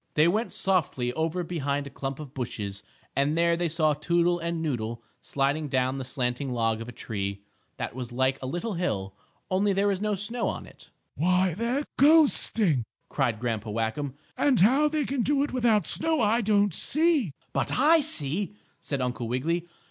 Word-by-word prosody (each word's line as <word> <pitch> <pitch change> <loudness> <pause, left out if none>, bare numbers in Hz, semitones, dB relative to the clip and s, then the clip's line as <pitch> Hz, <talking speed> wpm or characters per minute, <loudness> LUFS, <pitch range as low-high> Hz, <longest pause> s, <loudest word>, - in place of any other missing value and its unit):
They 155 +2 +5
went 215 +7 0
softly 150 -10 0
over 165 +4 -1
behind 145 -4 -2
a 140 - -9
clump 135 0 -5
of 145 -3 -9
bushes 105 -6 -4 0.3
and 145 +3 +1
there 170 0 +3
they 170 0 -1
saw 155 -1 +2
Toodle 175 +3 +1
and 170 0 -2
Noodle 120 -7 -3 0.2
sliding 140 +2 -1
down 130 0 0
the - - -3
slanting 125 +1 -2
log 115 -2 0
of 115 - -7
a - - -6
tree, 100 -3 -5 0.3
that - - -4
was 125 -1 -6
like 130 +2 +1
a 130 - -4
little 175 - -3
hill, 100 - -2 0.4
only 195 +2 +2
there 200 +1 +2
was 195 -1 -1
no 210 -1 0
snow 220 +5 -2
on - - -4
it. - - -17 0.2
"Why, 180 +2 +2
they're 235 - -1 0.2
coasting!" 255 - +4 0.3
cried 120 -6 0
Grandpa 115 -2 -2
Whackum. 115 +6 -2 0.2
"And 275 -5 +3
how 265 +9 +5
they 300 -1 0
can 270 -2 -1
do 280 +3 +2
it 290 - -4
without 230 -7 +2
snow 320 -1 +1
I 225 +2 +3
don't 205 -3 +2
see." 305 - +3 0.2
"But - - 0
I 310 +6 +6
see!" 200 - 0 0.2
said 140 -2 -3
Uncle 125 -2 -2
Wiggily. 165 +8 -1
165 Hz, 180 wpm, -27 LUFS, 130-210 Hz, 0.4 s, I